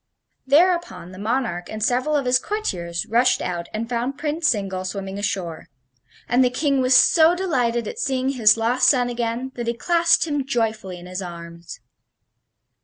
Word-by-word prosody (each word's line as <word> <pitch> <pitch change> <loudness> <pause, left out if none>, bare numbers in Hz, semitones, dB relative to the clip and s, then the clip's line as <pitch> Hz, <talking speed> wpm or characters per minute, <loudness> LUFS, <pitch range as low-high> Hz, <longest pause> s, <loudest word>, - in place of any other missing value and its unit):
Thereupon 340 - +2
the 185 - -11
monarch 220 -5 -2
and 215 0 -5
several 255 +6 +1
of 280 -3 0
his 250 0 +3
courtiers 175 - -3
rushed 245 +3 +2
out 175 -1 -4
and 220 +2 -4
found 245 +3 -3
Prince 310 +2 0
Zingle 195 -4 -2
swimming 195 +1 -5
ashore; 185 -6 -4 0.6
and 245 +2 +3
the 250 - +3
King 275 +1 0
was 255 0 +3
so 330 +1 +5
delighted 245 - -1
at - - -7
seeing 265 -1 -1
his 230 -5 +4
lost 235 +3 +2
son 250 -3 +2
again 240 +2 -3
that 240 -1 -6
he 235 - -1
clasped 340 +5 +2
him 290 -3 -2
joyfully 220 -7 -2
in 175 - -12
his 185 +1 -6
arms. 170 -1 -9
240 Hz, 170 wpm, -22 LUFS, 195-270 Hz, 0.6 s, so